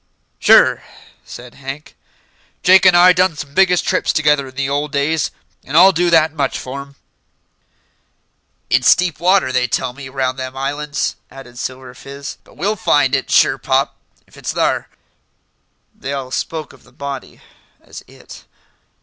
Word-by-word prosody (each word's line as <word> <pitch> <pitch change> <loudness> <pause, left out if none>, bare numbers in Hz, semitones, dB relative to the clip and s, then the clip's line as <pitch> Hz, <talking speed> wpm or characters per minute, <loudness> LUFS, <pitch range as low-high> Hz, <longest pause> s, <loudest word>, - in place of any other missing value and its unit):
"Sure," - - +5 0.4
said 120 0 -11
Hank. 135 +2 -9 0.7
"Jake 190 +1 +6
an' 180 - +5
I 180 +1 +7
done 180 -2 +1
some 145 -1 -8
biggish 185 -1 +3
trips - - 0
together 150 -3 +1
in 130 - -14
the 135 0 -2
old 145 +1 -2
days, 145 +2 0 0.3
and 145 +4 -2
I'll 190 +3 +8
do 175 0 +1
that 160 -2 +3
much 140 -4 -2
for'm." 140 +2 -8 1.8
"It's 125 0 +5
deep 180 -5 -2
water, 185 -4 +2
they 125 -1 +1
tell 125 +1 -2
me, 135 0 -10
round 130 -1 -2
them 130 0 -6
islands," 145 +2 -3
added 125 -2 -13
Silver 130 -1 -6
Fizz; 140 +2 -9
"but - - -21
we'll 205 +4 -1
find 145 -8 +2
it, 135 - -1
sure 135 - +3
pop, 135 +2 0 0.3
if - - -21
it's - - -4
thar." - - -1 1.0
They 135 - -6
all 135 -2 -5
spoke 160 +3 -4
of - - -19
the 125 - -22
body 140 0 -8 0.4
as - - -12
"it." - - -15
140 Hz, 160 wpm, -17 LUFS, 130-160 Hz, 1.8 s, I'll